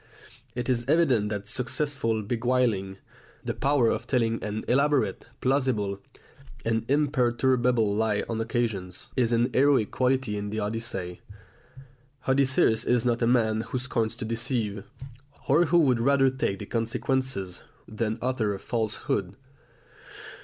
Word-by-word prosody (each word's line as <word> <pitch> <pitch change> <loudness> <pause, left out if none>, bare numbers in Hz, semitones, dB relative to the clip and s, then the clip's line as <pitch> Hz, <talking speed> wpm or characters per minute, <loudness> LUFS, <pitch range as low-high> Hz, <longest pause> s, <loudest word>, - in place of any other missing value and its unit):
It 120 -1 -3
is 120 -2 +1
evident 135 -10 +3
that 105 -1 -4
successful 125 -1 -1
beguiling, 115 -4 0 0.5
the - - -1
power 135 -4 +2
of 120 - -2
telling 115 -3 0
an 105 +1 -4
elaborate, 140 +2 +1
plausible, 125 -7 0 0.7
and 115 0 0
imperturbable 125 -5 +2
lie 110 -1 +1
on 115 -1 -2
occasions, 110 -6 -3
is 120 -3 +2
an 120 +1 +2
heroic 135 -5 +3
quality 130 -4 0
in 105 0 -4
the 110 +1 -3
Odyssey. 105 -4 -4 1.1
Odysseus 130 -4 +3
is 125 -1 +1
not 120 -1 +1
a 115 - +3
man 110 -3 +2
who 130 - -4
scorns 120 -3 -1
to 115 - -6
deceive, 115 -3 -2 0.6
or 155 +6 +4
who 170 +3 +3
would 130 -8 +4
rather 135 +2 +3
take 130 -7 -1
the 105 - -7
consequences 115 -3 -2 0.3
than 110 0 -2
utter 120 -5 0
a - - -8
falsehood. 110 -1 -2
120 Hz, 130 wpm, -27 LUFS, 110-130 Hz, 1.1 s, or